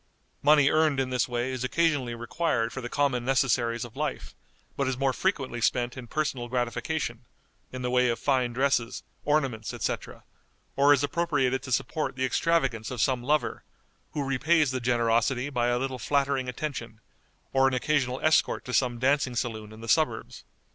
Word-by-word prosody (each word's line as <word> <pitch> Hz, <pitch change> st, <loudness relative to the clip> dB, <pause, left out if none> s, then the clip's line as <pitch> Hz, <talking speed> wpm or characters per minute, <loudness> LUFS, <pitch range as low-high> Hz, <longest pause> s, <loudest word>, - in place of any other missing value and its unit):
Money 145 Hz, -1 st, +5 dB
earned 155 Hz, -3 st, +3 dB
in 130 Hz, -1 st, -1 dB
this 125 Hz, -1 st, +1 dB
way 120 Hz, +1 st, -2 dB
is 130 Hz, -1 st, -4 dB
occasionally 140 Hz, -4 st, +1 dB
required 120 Hz, -1 st, -1 dB
for 130 Hz, -, -5 dB
the 120 Hz, -, -5 dB
common 135 Hz, -4 st, +1 dB
necessaries 120 Hz, -2 st, +1 dB
of 120 Hz, 0 st, -13 dB
life, 150 Hz, 0 st, -4 dB, 0.4 s
but 140 Hz, -, 0 dB
is 130 Hz, -1 st, -1 dB
more 135 Hz, 0 st, +1 dB
frequently 135 Hz, -10 st, -1 dB
spent 120 Hz, +1 st, +1 dB
in 130 Hz, -3 st, -8 dB
personal 135 Hz, -4 st, -2 dB
gratification, 120 Hz, +1 st, -2 dB, 0.5 s
in 130 Hz, 0 st, -6 dB
the 125 Hz, -, -1 dB
way 125 Hz, 0 st, +3 dB
of 115 Hz, -, 0 dB
fine 130 Hz, -1 st, +1 dB
dresses, 125 Hz, -1 st, 0 dB, 0.2 s
ornaments, 135 Hz, -8 st, 0 dB
etc., -, -, -4 dB, 0.5 s
or 140 Hz, +1 st, +5 dB
is 145 Hz, -1 st, +4 dB
appropriated 145 Hz, -4 st, 0 dB
to 130 Hz, -, -8 dB
support 150 Hz, +4 st, -1 dB
the 130 Hz, 0 st, 0 dB
extravagance 130 Hz, -5 st, +1 dB
of 125 Hz, -, -5 dB
some 125 Hz, +2 st, +1 dB
lover, 150 Hz, +5 st, 0 dB, 0.5 s
who 150 Hz, -2 st, -1 dB
repays 150 Hz, +2 st, +2 dB
the 130 Hz, -1 st, -3 dB
generosity 120 Hz, +3 st, +1 dB
by 120 Hz, -3 st, +1 dB
a 120 Hz, 0 st, +2 dB
little 130 Hz, 0 st, -3 dB
flattering 140 Hz, -1 st, 0 dB
attention, 120 Hz, -4 st, -5 dB, 0.5 s
or 135 Hz, 0 st, +4 dB
an 135 Hz, -, +1 dB
occasional 130 Hz, -1 st, 0 dB
escort 155 Hz, 0 st, +2 dB
to 125 Hz, -, -5 dB
some 125 Hz, -2 st, +2 dB
dancing 130 Hz, 0 st, +1 dB
saloon 110 Hz, -3 st, -3 dB
in 110 Hz, +1 st, -12 dB
the 115 Hz, -, -8 dB
suburbs. 120 Hz, -4 st, 0 dB
130 Hz, 175 wpm, -27 LUFS, 120-140 Hz, 0.5 s, Money